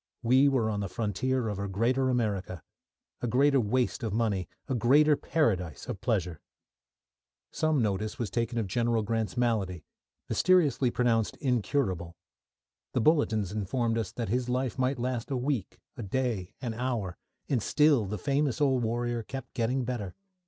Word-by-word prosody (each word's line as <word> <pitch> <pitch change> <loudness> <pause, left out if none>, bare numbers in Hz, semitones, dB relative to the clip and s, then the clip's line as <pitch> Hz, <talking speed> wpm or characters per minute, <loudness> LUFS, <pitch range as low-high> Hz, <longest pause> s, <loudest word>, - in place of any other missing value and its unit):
We 130 +4 +5
were 130 -5 +1
on 105 - -2
the 100 -2 -3
frontier 115 +5 -1
of 105 -2 -3
a 100 - -2
greater 120 +7 +1
America, 100 - -1 0.6
a 120 - -1
greater 135 +4 +4
waste 125 +5 0
of 110 -3 -2
money, 105 -6 0 0.2
a 135 - -1
greater 145 +6 +5
paradise 95 - -1
of - - -5
pleasure. 85 -4 -1 1.1
Some 155 -5 +1
notice 105 +1 -1
was 115 - -3
taken 120 0 -1
of 115 - 0
General 115 +2 0
Grant's 110 +2 -2
malady, 100 -9 0 0.4
mysteriously 155 -9 +3
pronounced 115 -2 +1
incurable. 110 - -1 0.8
The 125 - +1
bulletins 110 - +2
informed 115 +3 -1
us 115 - -3
that 115 -4 -3
his 125 +2 0
life 130 0 -1
might 130 +1 +1
last 125 +1 -2
a 135 - -1
week, 125 -6 -2 0.2
a 125 - -6
day, 110 -3 -2
an 120 -3 -2
hour 115 -6 -2 0.3
and 130 -5 +1
still 145 -4 +3
the 105 +2 -3
famous 140 0 0
old 135 -4 +3
warrior 120 +1 -1
kept 135 +3 -8
getting 125 +2 0
better. 115 -6 -4
120 Hz, 160 wpm, -29 LUFS, 105-130 Hz, 1.1 s, We